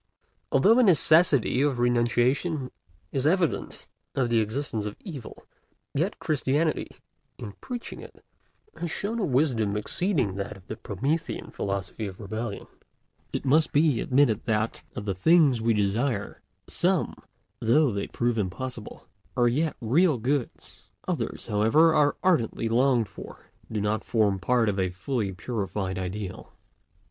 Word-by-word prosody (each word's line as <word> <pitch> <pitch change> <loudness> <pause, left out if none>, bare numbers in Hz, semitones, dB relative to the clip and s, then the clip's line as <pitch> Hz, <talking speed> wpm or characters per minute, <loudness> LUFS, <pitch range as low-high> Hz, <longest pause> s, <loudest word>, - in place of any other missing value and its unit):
Although 195 +12 +5
the 250 - +5
necessity 155 - +5
of 140 -3 +1
renunciation 120 +5 +1 0.4
is 135 +1 0
evidence 175 -1 0 0.3
of 125 -3 0
the 115 - +4
existence 110 -1 -2
of 105 - -6
evil, 150 - -9 0.5
yet 170 +8 -1
Christianity, 150 +1 0 0.5
in 110 -4 -7
preaching 245 -2 -6
it, - - -14 0.5
has 170 - -3
shown 215 +7 -3
a - - 0
wisdom 125 - +1
exceeding 135 - 0
that 100 +1 -5
of 90 - -18
the 110 - -6
Promethean 140 - -3
philosophy 100 +2 -3
of 95 -2 -9
rebellion. 110 +1 -5 0.7
It - - -4
must 155 +4 +3
be 145 -5 +3
admitted 130 -5 +2
that, 110 -1 -1
of 105 - -5
the 100 - -1
things 140 - +4
we 115 0 +2
desire, 105 +2 -1 0.3
some, - - +1 0.5
though 135 +4 +3
they 100 -1 -3
prove 120 -1 -1
impossible, 105 +4 -5 0.3
are 120 -1 +4
yet 155 +7 0
real 145 +6 +3
goods; 130 +2 -3 0.3
others, - - -3
however, 115 +11 +4
as 145 -1 +4
ardently 125 -10 +1
longed 120 -1 +2
for, - - -12 0.2
do 110 - -1
not 105 +1 -1
form 105 -4 +1
part 120 +5 +2
of 100 -1 0
a 95 -1 +1
fully 100 +3 -2
purified 95 -2 -3
ideal. 95 +1 -5
120 Hz, 140 wpm, -26 LUFS, 105-145 Hz, 0.7 s, Although